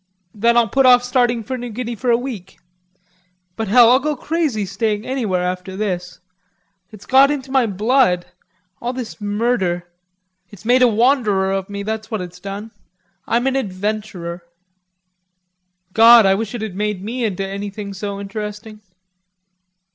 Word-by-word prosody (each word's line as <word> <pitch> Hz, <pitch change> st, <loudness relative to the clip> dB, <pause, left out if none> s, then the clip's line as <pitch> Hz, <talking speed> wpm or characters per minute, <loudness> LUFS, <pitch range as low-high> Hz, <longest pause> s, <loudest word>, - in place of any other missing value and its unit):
"Then 235 Hz, +3 st, +2 dB
I'll 235 Hz, -1 st, +4 dB
put 270 Hz, +2 st, +3 dB
off 245 Hz, -1 st, +6 dB
starting 245 Hz, -2 st, +1 dB
for 255 Hz, +4 st, -5 dB
New 245 Hz, 0 st, -6 dB
Guinea 240 Hz, +1 st, -4 dB
for 245 Hz, +3 st, -3 dB
a 235 Hz, -, +5 dB
week. 230 Hz, -7 st, -7 dB, 1.0 s
But 225 Hz, -, -3 dB
hell, 235 Hz, +3 st, +6 dB
I'd 260 Hz, +2 st, +4 dB
go 300 Hz, +1 st, -1 dB
crazy 295 Hz, -8 st, -1 dB
staying 210 Hz, +3 st, -2 dB
anywhere 215 Hz, -9 st, -1 dB
after 180 Hz, +1 st, -4 dB
this. 180 Hz, -4 st, -3 dB, 0.7 s
It's 210 Hz, -2 st, -14 dB
got 270 Hz, +1 st, +5 dB
into 275 Hz, -2 st, -3 dB
my 265 Hz, -3 st, +3 dB
blood... 210 Hz, -2 st, +2 dB, 0.6 s
all 245 Hz, +1 st, -2 dB
this 245 Hz, -3 st, -7 dB
murder. 205 Hz, -4 st, -1 dB, 0.6 s
It's 205 Hz, 0 st, -15 dB
made 250 Hz, +2 st, +4 dB
a 250 Hz, -, +7 dB
wanderer 220 Hz, -5 st, +2 dB
of 195 Hz, 0 st, -2 dB
me, 200 Hz, 0 st, -5 dB
that's 215 Hz, +1 st, -4 dB
what 220 Hz, -, -3 dB
it's 180 Hz, 0 st, -9 dB
done. 200 Hz, +3 st, -7 dB, 0.6 s
I'm 240 Hz, +2 st, +1 dB
an 270 Hz, 0 st, +1 dB
adventurer." 200 Hz, -5 st, -4 dB, 1.5 s
"God, 230 Hz, 0 st, +8 dB
I 195 Hz, -, +5 dB
wish 220 Hz, +3 st, -3 dB
it 225 Hz, -, -4 dB
had 210 Hz, -4 st, -5 dB
made 210 Hz, -2 st, -2 dB
me 240 Hz, +4 st, -3 dB
into 195 Hz, -3 st, -2 dB
anything 200 Hz, +1 st, -6 dB
so 200 Hz, 0 st, -5 dB
interesting." 210 Hz, +1 st, -7 dB
215 Hz, 155 wpm, -19 LUFS, 195-245 Hz, 1.5 s, God